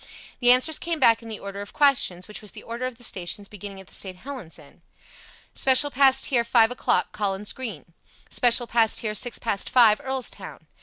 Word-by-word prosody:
The 245 -1 +5
answers 255 +5 +3
came 335 -2 -3
back 230 -4 +4
in 230 - -11
the 220 - -5
order 200 0 -8
of 205 - -10
questions, 245 -11 +1
which 210 - -9
was 210 - -7
the - - -11
order 235 +2 -5
of 250 -2 -9
the 240 - -13
stations 195 -1 -3
beginning 200 -1 -10
at 190 - -13
the - - -16
St. 185 -2 -5
Helens 250 -6 -9
end 145 -3 -18 0.7
"Special 270 +2 +4
passed 270 0 +4
here 245 -5 +1
five 230 0 +3
o'clock. 250 - 0
Collins 200 0 -3
Green." 225 -9 -8 0.3
"Special 240 0 +3
passed 230 -1 +2
here 215 -2 -3
six 240 +3 -1
past 205 -4 -2
five. 235 -2 +4
Earlstown." 265 -1 -5
230 Hz, 200 wpm, -24 LUFS, 200-255 Hz, 0.7 s, The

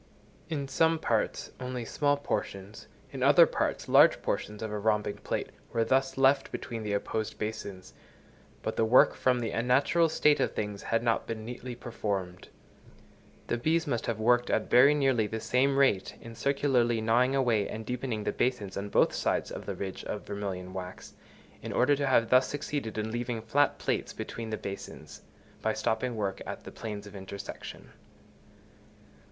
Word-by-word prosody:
In 145 -4 -2
some 160 +5 +2
parts, - - -1
only 125 -2 -4
small 145 +4 +1
portions, 100 -7 -4 0.2
in - - -6
other - - +7
parts, - - -2
large - - +6
portions 105 +1 -3
of 110 - -4
a 105 - -3
rhombic 105 -1 0
plate - - -3 0.2
were 115 - +1
thus 135 +1 +1
left 135 +1 +3
between 115 -2 -5
the 105 -1 -3
opposed 110 +2 -2
basins, 100 -3 -6 0.7
but - - -2
the - - +3
work, 115 +3 +6
from 125 -1 +1
the 115 -2 -2
unnatural 135 +8 +2
state 150 -1 +3
of - - 0
things, 105 -1 -3
had 115 0 0
not 115 -1 +1
been 110 -1 -5
neatly 125 +1 -6
performed. 100 -7 -4 1.0
The 120 - -2
bees 165 +6 +1
must 120 -6 -2
have 115 -2 -2
worked 120 +2 +3
at - - 0
very 135 +5 +7
nearly 135 -7 +2
the 110 +2 -4
same 135 +4 +2
rate 130 -9 +2
in 115 - -10
circularly 125 -2 +1
gnawing 120 +4 +2
away 120 -6 +2
and 110 0 -6
deepening 120 -2 -3
the - - 0
basins 120 -6 -1
on 100 +1 -4
both - - +3
sides - - -1
of - - -7
the - - -3
ridge 95 -2 -5
of 105 - -5
vermilion 95 -3 -5
wax, 90 -1 -8 0.5
in - - -6
order 130 +4 +3
to 140 -1 0
have 115 -3 +3
thus 130 +1 +5
succeeded 140 -6 -4
in 110 +1 -2
leaving 120 0 -2
flat 125 +7 +1
plates - - -2
between 115 -1 -6
the 110 - -2
basins, 95 -7 -8 0.4
by - - +1
stopping 115 +2 -1
work 100 -3 -2
at - - -6
the - - -9
planes 105 -2 -6
of 105 0 -11
intersection. 95 0 -8
115 Hz, 175 wpm, -29 LUFS, 105-130 Hz, 1.0 s, other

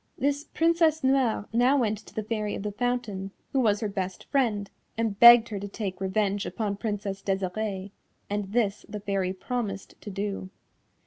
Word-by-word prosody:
This 285 +2 0
Princess 325 -2 +2
Noire 260 -5 +2
now 250 +4 +4
went 215 -5 +1
to 215 - -16
the 220 - -2
Fairy 210 -1 -2
of - - -5
the 210 - -2
Fountain, 225 -4 -2 0.2
who 270 - +3
was 210 -5 +2
her 215 - 0
best 190 -2 -4
friend, 225 -8 +1 0.3
and 225 -3 -1
begged 235 -1 +9
her 205 -3 -4
to 200 - -5
take 195 -2 -5
revenge 200 +1 0
upon 205 -3 -2
Princess 205 -2 -3
Desirée, 195 +1 -2 0.4
and 205 -1 -3
this 210 -3 0
the 210 0 -5
Fairy 195 -2 -1
promised 200 -1 -4
to - - -7
do. 195 -1 -4
210 Hz, 175 wpm, -27 LUFS, 195-240 Hz, 0.4 s, begged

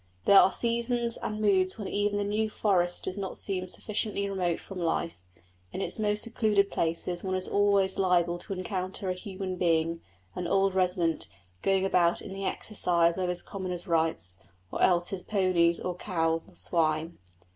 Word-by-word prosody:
There 200 - +8
are - - +5
seasons 235 +1 0
and 215 0 -4
moods 190 -3 +2
when 205 -3 -5
even 205 0 0
the 205 - 0
New 215 +2 -1
Forest 180 -5 +1
does 185 +2 -3
not 190 -1 -4
seem 185 -2 -2
sufficiently 205 +1 -2
remote 180 -4 -1
from 195 -2 -9
life: 165 - -2 0.5
in - - -5
its 195 - -1
most 210 -1 +4
secluded 215 -4 +1
places 170 +2 -1
one 190 -1 -2
is 185 0 0
always 200 -2 +2
liable 175 -2 +2
to 195 - -5
encounter 185 0 -4
a - - 0
human 185 -1 -6
being, 165 -1 +1 0.3
an 180 - -4
old 195 0 +2
resident, 180 -3 0 0.3
going 195 0 +1
about 175 -3 +2
in 190 - -8
the 195 0 -5
exercise 170 -5 +2
of 180 -1 -1
his 180 0 0
commoner's 185 -3 -4
rights; 160 - +2 0.3
or - - -4
else 175 -1 +3
his 195 -2 -5
ponies 180 -5 +1
or 180 - -3
cows 165 -3 -2
or - - -20
swine. 155 - 0
185 Hz, 175 wpm, -28 LUFS, 170-200 Hz, 0.5 s, There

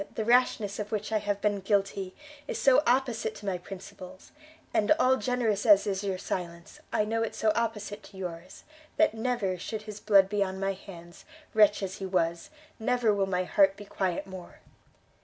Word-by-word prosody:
the 220 - -2
rashness 235 -4 +2
of 210 0 -5
which 215 0 -3
I 215 - +2
have 205 -1 -2
been 205 -1 +1
guilty, 195 -1 -1 0.3
is - - -3
so 270 +1 +5
opposite 240 -4 +1
to 205 - -11
my 185 -2 -1
principles, 185 0 -11 0.4
and, 210 +4 +2
all 260 -4 +4
generous 235 -6 0
as 205 -3 +6
is 195 -1 -2
your 195 -2 -2
silence, 170 -2 -6
I 210 - +1
know 225 +1 -1
it 225 - -2
so 220 - +2
opposite 215 -2 -3
to 195 - -14
yours, 180 -1 -7 0.3
that 320 -7 +4
never, 220 -5 -1
should 215 +3 -5
his 215 -1 -8
blood 200 -3 +5
be 205 0 -1
on 190 0 -5
my 195 0 0
hands, 175 -3 -12 0.3
wretch 210 -2 +4
as 190 0 -4
he 195 - -4
was, 170 -2 -1 0.3
never 240 -1 +2
will 195 -1 0
my 185 -1 0
heart 195 +1 +3
be 205 - -10
quiet 190 -3 -2
more." 190 -2 -11
205 Hz, 190 wpm, -28 LUFS, 190-220 Hz, 0.4 s, as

